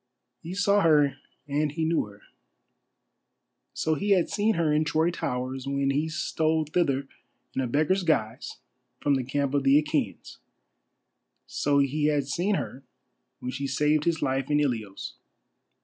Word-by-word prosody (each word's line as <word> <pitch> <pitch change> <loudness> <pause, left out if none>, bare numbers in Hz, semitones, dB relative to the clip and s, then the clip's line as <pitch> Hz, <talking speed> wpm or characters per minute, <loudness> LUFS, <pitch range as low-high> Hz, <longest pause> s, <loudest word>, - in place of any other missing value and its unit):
He 170 +3 -6
saw 200 +1 +3
her 150 -5 +4 0.3
and 150 +1 0
he 160 0 -1
knew 165 -5 +1
her. 105 0 -16 1.5
So 160 - 0
he 200 +7 +2
had 180 -3 +2
seen 215 +1 +1
her 160 -3 +1
in 150 +1 +3
Troy 160 +2 +1
towers 130 -4 -3
when 140 0 0
he 150 +3 0
stole 155 0 0
thither 140 -4 0 0.5
in 130 - -1
a 130 - -1
beggar's 155 +9 +2
guise 125 -8 -1 0.4
from 145 - +1
the 135 -2 +1
camp 140 +2 -1
of 140 - +2
the 135 +2 +5
Achæans. 150 - -3 1.1
So 145 0 0
he 140 +2 +1
had 145 -2 +2
seen 180 +9 0
her 135 - -4 0.6
when 125 - -3
she 140 +1 -3
saved 150 +3 +1
his 165 -2 0
life 135 0 -1
in 145 0 +3
Ilios. 115 -9 -2
145 Hz, 155 wpm, -27 LUFS, 135-160 Hz, 1.5 s, the